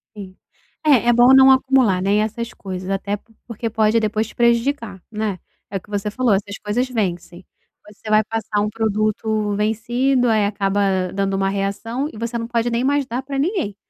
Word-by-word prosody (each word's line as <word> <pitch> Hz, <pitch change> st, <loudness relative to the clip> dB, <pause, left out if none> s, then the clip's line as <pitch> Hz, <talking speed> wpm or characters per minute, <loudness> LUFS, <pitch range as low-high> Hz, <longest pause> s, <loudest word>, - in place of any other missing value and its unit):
Sim. 190 Hz, -2 st, -10 dB, 0.5 s
É 265 Hz, -6 st, +4 dB
é -, -, +5 dB
bom 240 Hz, +2 st, +6 dB
não 265 Hz, 0 st, +8 dB
acumular, 260 Hz, -8 st, +3 dB
né, 200 Hz, +2 st, +1 dB
e -, -, +3 dB
essas 225 Hz, +2 st, -3 dB
coisas, 185 Hz, -1 st, -7 dB
até 200 Hz, +1 st, -2 dB
por 225 Hz, -, -28 dB
porque 230 Hz, 0 st, -4 dB
pode 220 Hz, +1 st, +2 dB
depois 215 Hz, 0 st, -1 dB
te -, -, -15 dB
prejudicar, 235 Hz, -4 st, 0 dB
né. 210 Hz, -3 st, -3 dB, 0.3 s
É 195 Hz, -, -3 dB
o 185 Hz, -, -8 dB
que -, -, -23 dB
você 205 Hz, 0 st, -2 dB
falou, 245 Hz, +1 st, +1 dB
essas 200 Hz, +1 st, -2 dB
coisas 235 Hz, +5 st, 0 dB
vencem, 180 Hz, -6 st, -4 dB, 0.4 s
você 210 Hz, +1 st, -11 dB
vai 215 Hz, 0 st, +4 dB
passar 220 Hz, -1 st, -2 dB
um 210 Hz, -, 0 dB
produto 215 Hz, -1 st, -1 dB
vencido, 240 Hz, +4 st, +1 dB
aí 215 Hz, -2 st, +3 dB
acaba 195 Hz, -2 st, 0 dB
dando 195 Hz, 0 st, -1 dB
uma 195 Hz, 0 st, 0 dB
reação 200 Hz, +7 st, -2 dB
e -, -, -10 dB
você 235 Hz, +1 st, -3 dB
não 230 Hz, 0 st, -4 dB
pode 235 Hz, 0 st, 0 dB
nem 235 Hz, +1 st, -1 dB
mais 280 Hz, 0 st, +1 dB
dar 245 Hz, +1 st, -4 dB
pra 275 Hz, +1 st, -5 dB
ninguém, 300 Hz, -, -1 dB
215 Hz, 200 wpm, -20 LUFS, 200-240 Hz, 0.5 s, não